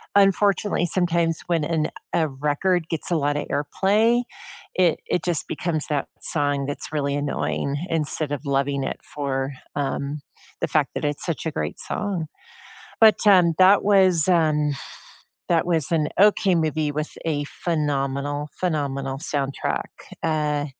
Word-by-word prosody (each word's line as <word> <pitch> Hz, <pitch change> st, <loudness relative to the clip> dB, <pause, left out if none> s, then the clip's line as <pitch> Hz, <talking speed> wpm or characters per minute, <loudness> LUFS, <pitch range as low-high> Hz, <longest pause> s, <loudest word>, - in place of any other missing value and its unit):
Unfortunately, 200 Hz, -1 st, +3 dB
sometimes 170 Hz, -2 st, +1 dB
when 170 Hz, -3 st, +1 dB
an 155 Hz, 0 st, 0 dB, 0.3 s
a 160 Hz, -2 st, +2 dB
record 150 Hz, +5 st, 0 dB
gets 165 Hz, +1 st, -2 dB
a -, -, +3 dB
lotta 145 Hz, -1 st, 0 dB
airplay, 210 Hz, +10 st, +2 dB, 0.5 s
it 180 Hz, -3 st, +3 dB
it 180 Hz, -, 0 dB
just 175 Hz, -4 st, -1 dB
becomes 160 Hz, -4 st, -2 dB
that 145 Hz, -2 st, -1 dB
song 145 Hz, -3 st, 0 dB
that's 145 Hz, +1 st, -4 dB
really 140 Hz, -2 st, -1 dB
annoying 145 Hz, 0 st, -2 dB
instead 155 Hz, -2 st, -1 dB
of 145 Hz, +1 st, -5 dB
loving 140 Hz, 0 st, 0 dB
it -, -, -4 dB
for, 135 Hz, -1 st, -3 dB, 0.2 s
um, 140 Hz, +1 st, -2 dB, 0.4 s
the -, -, 0 dB
fact -, -, +1 dB
that -, -, -2 dB
it's 145 Hz, -1 st, -2 dB
such 170 Hz, 0 st, -3 dB
a 160 Hz, -, -1 dB
great -, -, -4 dB
song. 195 Hz, -6 st, -2 dB, 0.7 s
But, 220 Hz, -1 st, +6 dB
um, 180 Hz, -5 st, +6 dB
that 190 Hz, +2 st, +6 dB
was 190 Hz, -5 st, +4 dB
an 155 Hz, -4 st, +3 dB, 0.8 s
that 170 Hz, -2 st, +2 dB
was 165 Hz, -4 st, 0 dB
an 155 Hz, -3 st, +1 dB
okay 200 Hz, -2 st, +4 dB
movie 155 Hz, -2 st, 0 dB
with 150 Hz, +1 st, -4 dB
a 145 Hz, -3 st, -1 dB
phenomenal, 145 Hz, -2 st, -2 dB
phenomenal 140 Hz, -6 st, -2 dB
soundtrack. 140 Hz, -3 st, -2 dB, 0.4 s
Uh, 150 Hz, -2 st, 0 dB
155 Hz, 140 wpm, -23 LUFS, 145-175 Hz, 0.8 s, But